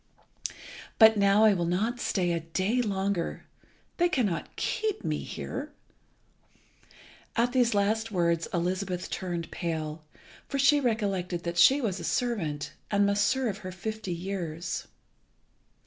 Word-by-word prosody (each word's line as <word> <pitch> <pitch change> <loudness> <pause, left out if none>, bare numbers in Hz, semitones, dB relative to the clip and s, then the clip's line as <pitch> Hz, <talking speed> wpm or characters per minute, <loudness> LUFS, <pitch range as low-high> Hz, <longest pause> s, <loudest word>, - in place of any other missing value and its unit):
But 220 -1 +8
now 200 +1 +4
I 215 - +6
will 175 -3 -1
not 220 +8 0
stay 180 -6 0
a 170 - 0
day 185 +9 0
longer. 195 -4 -2 0.5
They 350 0 +3
cannot 215 - -1
keep 430 -2 -1
me - - 0
here." - - -6 1.6
At 240 +1 +2
these 245 -4 +3
last 220 +3 +1
words 170 -3 +1
Elizabeth 180 +1 -2
turned 175 -3 -3
pale, 160 -2 -3 0.4
for 275 - -2
she 280 +2 +5
recollected 195 -8 -1
that 170 0 -2
she 270 +11 +7
was 195 -6 -1
a - - -7
servant, 170 -12 -1 0.2
and 205 -1 +3
must 200 0 +3
serve 250 -6 0
her 185 -3 -6
fifty 215 +2 -5
years. 175 -2 -4
195 Hz, 130 wpm, -28 LUFS, 175-225 Hz, 1.6 s, But